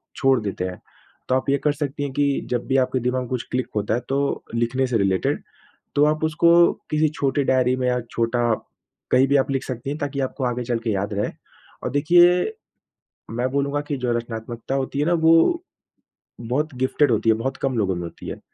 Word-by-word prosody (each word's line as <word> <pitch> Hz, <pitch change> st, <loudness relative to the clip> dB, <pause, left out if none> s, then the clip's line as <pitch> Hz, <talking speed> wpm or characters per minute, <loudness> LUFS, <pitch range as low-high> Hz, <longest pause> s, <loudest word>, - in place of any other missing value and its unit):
छोड़ 135 Hz, -2 st, +3 dB
देते 100 Hz, -3 st, -3 dB
हैं। 90 Hz, -1 st, -6 dB, 0.5 s
तो 130 Hz, -, +3 dB
आप 130 Hz, +1 st, -1 dB
ये 140 Hz, -, +3 dB
कर 150 Hz, -, +3 dB
सकती 145 Hz, 0 st, -3 dB
हैं 140 Hz, -, -3 dB
कि 145 Hz, +1 st, +2 dB, 0.2 s
जब 120 Hz, -1 st, -1 dB
भी 135 Hz, -, +1 dB
आपके 130 Hz, 0 st, +1 dB
दिमाग 125 Hz, +1 st, 0 dB
में 125 Hz, -, -7 dB
कुछ 125 Hz, -2 st, -2 dB
क्लिक 130 Hz, 0 st, -1 dB
होता 105 Hz, +1 st, 0 dB
है -, -, 0 dB
तो 140 Hz, +1 st, 0 dB
लिखने 120 Hz, +3 st, +1 dB
से 120 Hz, -2 st, +1 dB
रिलेटेड, 95 Hz, -2 st, +1 dB, 0.5 s
तो 145 Hz, -, +4 dB
आप 155 Hz, +1 st, -3 dB
उसको 165 Hz, +2 st, +3 dB, 0.4 s
किसी 155 Hz, 0 st, +3 dB
छोटे 140 Hz, 0 st, +1 dB
डायरी 130 Hz, -1 st, +3 dB
में 125 Hz, -1 st, 0 dB
या 125 Hz, 0 st, +1 dB
छोटा 115 Hz, +1 st, 0 dB, 0.7 s
कहीं 130 Hz, +2 st, +5 dB
भी 140 Hz, -, +2 dB
आप 135 Hz, +1 st, +1 dB
लिख 135 Hz, 0 st, -1 dB
सकती 130 Hz, +1 st, -5 dB
हैं, 145 Hz, -, -3 dB
ताकि 140 Hz, -1 st, -3 dB
आपको 130 Hz, +1 st, -3 dB
आगे 125 Hz, 0 st, -1 dB
चल 120 Hz, -2 st, -1 dB
के 115 Hz, -, 0 dB
याद 100 Hz, +1 st, -2 dB
रहे। 100 Hz, +1 st, -1 dB, 0.5 s
और -, -, -1 dB
देखिए, 175 Hz, -, +4 dB, 0.8 s
मैं 120 Hz, +3 st, -1 dB
बोलूँगा 140 Hz, +1 st, 0 dB
कि 145 Hz, -, -1 dB
जो 125 Hz, -1 st, -1 dB
रचनात्मकता 115 Hz, +2 st, -5 dB
होती 135 Hz, +1 st, -2 dB
है 150 Hz, -, +1 dB
ना 175 Hz, -, +2 dB
वो 165 Hz, -, +4 dB, 0.8 s
बहुत 135 Hz, +6 st, -1 dB
गिफ़्टेड 130 Hz, +1 st, +2 dB
होती 115 Hz, +1 st, +2 dB
है, 110 Hz, -, +5 dB
बहुत 130 Hz, +4 st, -3 dB
कम 130 Hz, -3 st, -1 dB
लोगों 95 Hz, -4 st, +1 dB
में 85 Hz, -, -4 dB
होती 85 Hz, -, -9 dB
है। -, -, -6 dB
130 Hz, 215 wpm, -23 LUFS, 120-145 Hz, 0.8 s, कहीं